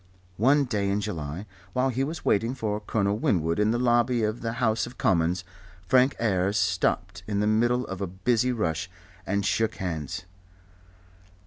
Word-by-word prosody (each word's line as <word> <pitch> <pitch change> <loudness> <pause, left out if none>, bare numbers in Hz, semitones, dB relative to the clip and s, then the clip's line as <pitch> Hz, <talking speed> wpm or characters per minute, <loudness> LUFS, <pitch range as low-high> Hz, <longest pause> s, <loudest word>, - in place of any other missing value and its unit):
One 140 +7 +4
day 105 -5 -1
in 100 +1 +1
July 85 -3 -4 0.3
while 130 +1 +2
he 130 +1 0
was 155 +4 -5
waiting 115 +5 +2
for 105 -4 -2
Colonel 105 -1 0
Winwood 85 -5 +1
in 105 0 +3
the 120 - +1
lobby 120 -1 +2
of 110 +2 -1
the 115 0 -2
House 115 -1 +1
of 125 - -12
Commons, 85 0 +1 0.4
Frank 130 +5 +4
Ayres 100 -2 +1
stopped 90 -1 0
in 100 -2 -1
the 105 - +2
middle 120 +4 +2
of 95 0 -6
a 100 - -1
busy 115 +7 +1
rush 90 -7 -1 0.4
and 100 +1 0
shook 110 +1 +1
hands. 80 -4 -4
105 Hz, 165 wpm, -26 LUFS, 95-120 Hz, 0.4 s, One